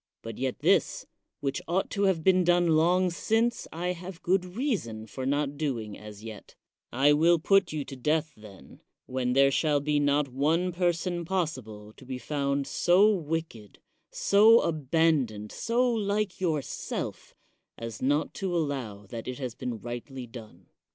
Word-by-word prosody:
But 115 -1 -7
yet 130 -1 -2
this, - - +2 0.4
which 140 -1 -2
ought 180 +3 0
to 200 0 +1
have 180 -5 +1
been 185 0 +4
done 175 0 +3
long 175 +3 +3
since, 225 +6 0
I 175 +2 -3
have 180 0 -6
good 185 +1 +2
reason 180 - -3
for 130 +4 -5
not 145 0 -1
doing 115 -9 -3
as 105 0 -11
yet; 110 -2 -10 0.4
I 140 +4 +4
will 165 +3 +4
put 195 +3 +3
you 150 -2 -3
to 135 - -8
death, 150 +3 0
then, 105 -2 -15 0.2
when 125 -1 -1
there 135 +1 +5
shall 150 +1 +2
be 145 +1 0
not 145 0 +2
one 155 +8 +1
person 175 0 -1
possible 130 - -4
to - - -14
be 130 0 -5
found 140 0 -1
so 195 +9 +4
wicked, 160 - -4 0.3
so 215 +3 +5
96 - - -2
CICERO - - +2
abandoned, 145 -8 0
so 245 +2 +1
like 205 -3 -1
yourself, 160 -6 -3 0.4
as 115 -2 -7
not 145 +4 +1
to 185 -3 -2
allow 130 -10 -3
that 115 +3 -8
it 125 -1 -4
has 130 -4 -4
been 125 -1 -5
rightly 120 +3 -7
done. 110 -7 -12
150 Hz, 165 wpm, -28 LUFS, 125-175 Hz, 0.4 s, there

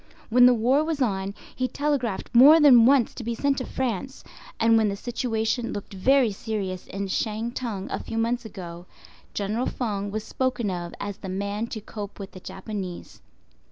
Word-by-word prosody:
When 250 +1 +7
the 250 - +6
war 255 +6 +3
was 315 -2 -2
on, 200 -5 -1 0.2
he 255 - 0
telegraphed 275 -8 -2
more 280 +7 +9
than 250 -6 +8
once 270 -3 +4
to 245 - -7
be 235 +1 -2
sent 275 +3 +1
to 255 - -5
France; 260 +1 -3 0.4
and 230 0 +5
when 220 -2 +3
the 200 - -2
situation 230 +1 -2
looked 205 0 -7
very 250 +4 +3
serious 195 -3 -4
in 200 0 -4
Shantung 220 0 -3
a - - -2
few 225 - -6
months 235 +2 0
ago, 175 -5 -9 0.5
General 210 +5 -1
Feng 205 -5 -2
was 215 +1 -3
spoken 250 -6 -1
of 175 -1 -5
as 205 -1 -5
the 195 - -7
man 200 +4 -2
to 220 - -6
cope 205 -1 -8
with 200 -1 -8
the 185 - -10
Japanese. 190 -2 -7
225 Hz, 180 wpm, -25 LUFS, 200-250 Hz, 0.5 s, more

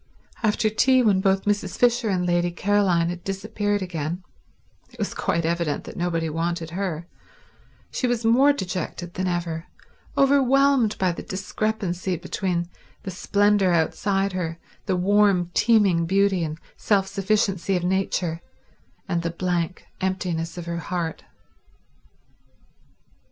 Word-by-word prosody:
After 215 -1 +2
tea, 255 +4 +4
when 200 -4 +3
both 195 -1 +2
Mrs. 205 -2 -1
Fisher 240 -2 +3
and 180 -2 0
Lady 175 0 +2
Caroline 180 -2 +2
had 175 0 -6
disappeared 205 +1 -2
again—it 175 - -8
was 210 -3 -2
quite 170 -1 -1
evident 170 -3 -1
that - - -9
nobody 165 -2 -1
wanted 165 +1 -2
her—she 180 - -6
was 240 -2 -1
more 260 +6 +6
dejected 180 -6 -4
than 185 0 -2
ever, 170 -2 -3 0.5
overwhelmed 275 -3 +4
by 185 -2 +2
the 170 - -6
discrepancy 190 -1 -2
between 175 -1 -2 0.4
the 190 - -5
splendour 200 +1 +2
outside 195 +4 +1
her, 165 -3 -3 0.3
the 190 - +1
warm, 190 -1 +3
teeming 200 -8 +3
beauty 195 -1 +2
and 155 -1 -4 0.2
self 200 -3 +2
sufficiency 195 -1 0
of 175 - -3
nature, 180 -2 -1 0.7
and 170 -3 0
the 170 - -2
blank 175 0 -2 0.2
emptiness 180 -3 -2
of 175 - -5
her 170 0 -3
heart. 170 -1 -4
185 Hz, 125 wpm, -24 LUFS, 170-205 Hz, 0.7 s, more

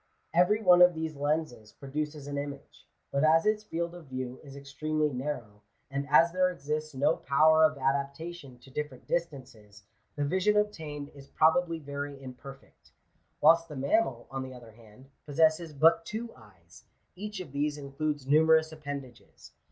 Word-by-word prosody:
Every 180 +6 +3
one 180 -2 +7
of 180 -1 +7
these 160 -1 -4
lenses 145 -6 -2
produces 150 +1 -5
an 145 0 -5
image; 140 0 -7 0.2
but 140 +1 +1
as 160 +1 +4
its 215 0 +1
field 170 -4 -3
of 175 -2 -11
view 130 -1 -5
is 140 -2 -12
extremely 150 +2 -2
narrow, 125 -6 -5 0.3
and 140 +1 -3
as 165 +3 +6
there 185 0 +3
exists 155 -3 -4
no 130 - +2
power 155 +3 +4
of 155 -1 +1
adaptation 140 +2 -3
to 135 - -16
different 140 -2 -5
distances, 125 -11 -5 0.3
the 145 - -1
vision 190 +7 +2
obtained 155 -9 -2
is 140 -1 -15
probably 165 +1 +2
very 145 -1 -6
imperfect. 135 +1 -13 0.5
Whilst 165 +2 +5
the 150 - -8
mammal, 135 - 0
on 135 0 -3
the 130 -1 -7
other 120 -2 -13
hand, 110 +3 -18 0.2
possesses 160 +2 +2
but 165 +3 +4
two 225 +6 -6
eyes; 95 -7 -18 0.3
each 210 +1 -6
of 175 -7 -8
these 145 +1 -1
includes 145 0 -3
numerous 160 +2 +4
appendages. 140 -5 -9
145 Hz, 160 wpm, -29 LUFS, 135-165 Hz, 0.5 s, one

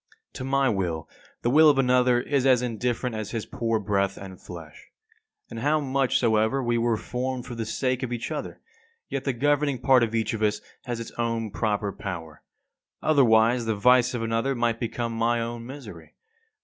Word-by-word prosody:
56. - - -10
To - - -4
my 135 0 +2
will 90 -7 -1 0.4
the 120 - +2
will 155 +3 +7
of 145 - +3
another 125 -1 +3
is 140 +1 0
as 125 -2 +4
indifferent 120 0 -2
as 110 -1 -4
his 115 -3 -4
poor 115 -1 -1
breath 100 -1 0
and 95 -2 -10
flesh. 85 -4 -11 0.6
And 115 - -7
how 150 +5 +2
much 135 -2 +1
soever 110 +3 +2
we 120 -1 +1
were 115 -1 +1
formed 125 +2 -4
for 125 - -7
the 115 -2 -4
sake 130 +1 -1
of 130 -2 -3
each 120 -1 -4
other, - - -5 0.5
yet 135 -1 -3
the 135 - 0
governing 145 +2 +1
part 130 +1 +4
of 115 -1 0
each 115 +1 0
of 110 - -4
us 105 -1 +1 0.3
has 120 -3 -3
its 115 - -7
own 115 -2 -1
proper 105 -1 -1
power; 85 -7 -7 0.6
otherwise 120 -5 +4
the 110 -1 0
vice 125 +3 +4
of 115 - -2
another 115 +4 0
might 120 -1 0
become 115 0 -3
my 115 +1 +1
own 115 0 -5
misery. 140 +2 -10
120 Hz, 190 wpm, -25 LUFS, 110-130 Hz, 0.6 s, will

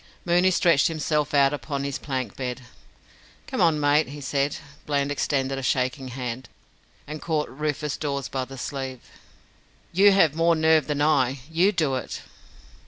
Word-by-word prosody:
Mooney 175 +1 +4
stretched 170 -5 +3
himself 150 -2 -1
out 140 0 +4
upon 140 +1 -4
his 140 0 -3
plank 130 -3 -4
bed. 125 -1 -4 0.8
"Come - - -3
on, 160 -2 +4
mate," 145 +1 +3
he 145 +2 -8
said. 140 +1 -1 0.3
Bland 140 -1 0
extended 135 -1 -1
a - - -5
shaking 130 +1 -1
hand, 125 0 -5 0.6
and 150 +1 -7
caught 155 -3 -1
Rufus 150 +1 -3
Dawes 140 -3 -3
by 130 -1 -3
the 135 +1 -10
sleeve. 130 -2 -5 0.9
"You 200 +3 +6
have 180 -7 +4
more 165 +1 +3
nerve 160 -1 +3
than 145 -1 0
I. 135 -4 +2
You 175 +5 +3
do 155 -8 0
it." - - -6
145 Hz, 160 wpm, -25 LUFS, 135-155 Hz, 0.9 s, You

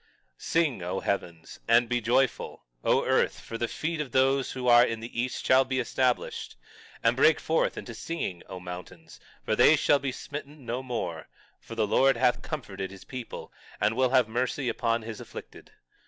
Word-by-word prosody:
21:13 - - -36 0.3
Sing, 155 - +1
O 90 +2 -2
heavens; 85 -5 -3
and 120 +1 +5
be 120 0 0
joyful, 120 +3 0 0.2
O - - +3
earth; - - +2
for 115 - -8
the 120 - 0
feet 160 +4 -3
of 140 - -5
those 135 0 +2
who 125 -1 -4
are 120 0 +8
in 115 -2 -1
the 115 +1 -4
east 125 +1 -4
shall 130 +1 +6
be 130 0 -2
established; 125 +1 -1 0.5
and 115 +1 +4
break 150 +4 +5
forth 160 - 0
into 120 - -6
singing, 115 - -4
O 95 - -6
mountains; 90 -2 -9 0.3
for 110 - +1
they 125 +7 +7
shall 145 -1 +3
be 135 -1 -2
smitten 145 +1 -8
no 120 +2 -2
more; 115 -11 -4 0.3
for 115 - -10
the 110 -2 +2
Lord 135 +5 +3
hath 125 0 +2
comforted 100 - -5
his 95 0 -12
people, 125 -3 -8 0.3
and 105 +2 +2
will 130 0 +3
have 125 -3 +4
mercy 125 +3 -1
upon 115 0 0
his 110 -1 -7
afflicted. - - -11
120 Hz, 185 wpm, -28 LUFS, 110-135 Hz, 0.5 s, are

